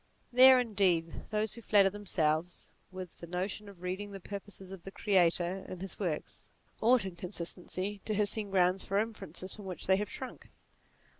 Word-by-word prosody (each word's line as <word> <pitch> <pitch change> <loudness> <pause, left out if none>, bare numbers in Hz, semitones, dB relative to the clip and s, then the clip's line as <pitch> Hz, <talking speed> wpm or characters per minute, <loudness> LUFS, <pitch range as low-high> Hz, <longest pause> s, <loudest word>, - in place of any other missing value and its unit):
There, 260 +1 +9
indeed, 190 -8 +1
those 215 -1 0
who 235 - -7
flatter 200 -3 +5
themselves 175 -4 -1 0.2
with 185 -2 -8
the 170 - -8
notion 190 +4 -3
of 185 -3 -14
reading 195 +3 -4
the 195 - -6
purposes 195 0 -7
of 195 -2 -8
the 195 - -7
Creator 185 -2 +2
in 185 - -6
his 190 +1 -5
works, 175 -7 -3 0.3
ought 235 -1 +5
in 190 -2 -5
consistency 185 +2 -4
to 215 - -1
have 210 0 +2
seen 210 0 -2
grounds 185 0 +3
for 195 - -1
inferences 200 -4 -3
from 210 - -10
which 185 -2 -5
they 190 0 +4
have 205 0 -2
shrunk. 260 +1 -8
195 Hz, 175 wpm, -32 LUFS, 180-205 Hz, 0.3 s, There